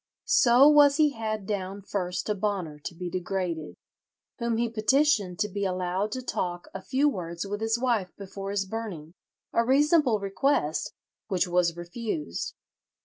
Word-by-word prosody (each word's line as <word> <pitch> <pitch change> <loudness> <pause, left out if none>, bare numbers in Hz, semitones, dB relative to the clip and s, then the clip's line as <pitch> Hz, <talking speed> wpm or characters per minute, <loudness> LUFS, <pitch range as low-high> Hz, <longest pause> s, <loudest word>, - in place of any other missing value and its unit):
"So 250 +3 +6
was 290 -1 +6
he 300 -1 +4
had 215 -4 -3
down 195 -1 -4
first 180 -2 -3
to 210 - 0
Bonner 190 -7 -2
to 170 - -5
be 180 +1 -5
degraded, 180 -3 -3 0.6
whom 235 -1 0
he 235 +1 +1
petitioned 225 - +2
to 210 - +1
be 200 0 -4
allowed 185 +2 -1
to 255 - -4
talk 175 -7 -3
a 190 - -6
few 270 +7 +1
words 170 -8 -3
with 205 +2 -4
his 225 +1 +1
wife 235 -7 0
before 195 0 -7
his 200 -1 -1
burning"—a 190 0 -5
reasonable 280 -1 +4
request, 195 - 0 0.3
which 185 -3 +1
was 175 -1 +1
refused. 175 - -4
200 Hz, 150 wpm, -27 LUFS, 180-235 Hz, 0.6 s, So